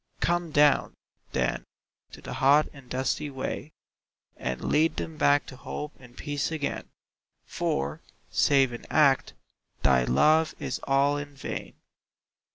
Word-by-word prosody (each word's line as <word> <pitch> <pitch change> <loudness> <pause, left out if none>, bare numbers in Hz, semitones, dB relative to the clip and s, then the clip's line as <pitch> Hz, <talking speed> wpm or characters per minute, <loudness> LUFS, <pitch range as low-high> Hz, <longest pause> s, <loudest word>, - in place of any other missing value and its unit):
Come 175 0 0
down, 145 -1 +3 0.4
then, - - -1 0.5
to - - -12
the - - -6
hot 145 +3 +4
and 135 -4 -15
dusty 130 +4 -1
way, 135 +3 -5 0.6
And 65 0 -4
lead 160 +2 +3
them 160 - -5
back 145 -2 +3
to 130 - -10
hope 150 +3 -6
and 125 -1 -16
peace 145 +1 -2
again 155 -3 -3 0.6
For, 70 +2 -2 0.3
save 135 -3 +3
in 120 - -9
Act, 140 -4 +3 0.5
thy 65 -1 +4
Love 155 - +3
is - - -4
all 140 +1 +3
in 145 0 -7
vain. - - -6
140 Hz, 135 wpm, -27 LUFS, 130-150 Hz, 0.6 s, hot